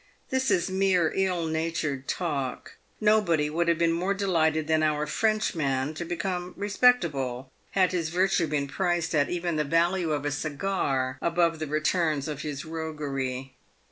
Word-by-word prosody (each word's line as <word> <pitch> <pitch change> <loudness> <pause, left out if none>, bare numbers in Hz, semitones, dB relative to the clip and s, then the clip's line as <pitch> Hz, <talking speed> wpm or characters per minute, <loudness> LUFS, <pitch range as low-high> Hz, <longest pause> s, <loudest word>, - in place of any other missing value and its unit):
This 260 0 +1
is 175 - +2
mere 190 -3 +2
ill 185 -3 +1
natured 160 -4 -2
talk. 140 -8 -3 0.2
Nobody 185 -9 +3
would 170 +2 0
have 170 -1 +3
been 170 0 +2
more 180 +4 0
delighted 160 -6 +1
than 155 0 +2
our 150 -1 +1
Frenchman 150 -7 0
to 160 - -5
become 180 +1 -3
respectable, 165 - +1 0.2
had 185 -2 +3
his 170 -3 -1
virtue 180 -1 +2
been 145 -2 -1
priced 175 +1 -1
at 145 -2 +2
even 175 -2 -1
the 150 - +2
value 170 +3 +1
of 145 -1 -1
a 145 - 0
cigar 145 -4 -1
above 170 -1 +1
the 155 - -3
returns 155 0 0
of 150 -1 -4
his 145 0 -5
roguery. 140 -5 -4
165 Hz, 155 wpm, -27 LUFS, 150-180 Hz, 0.2 s, Nobody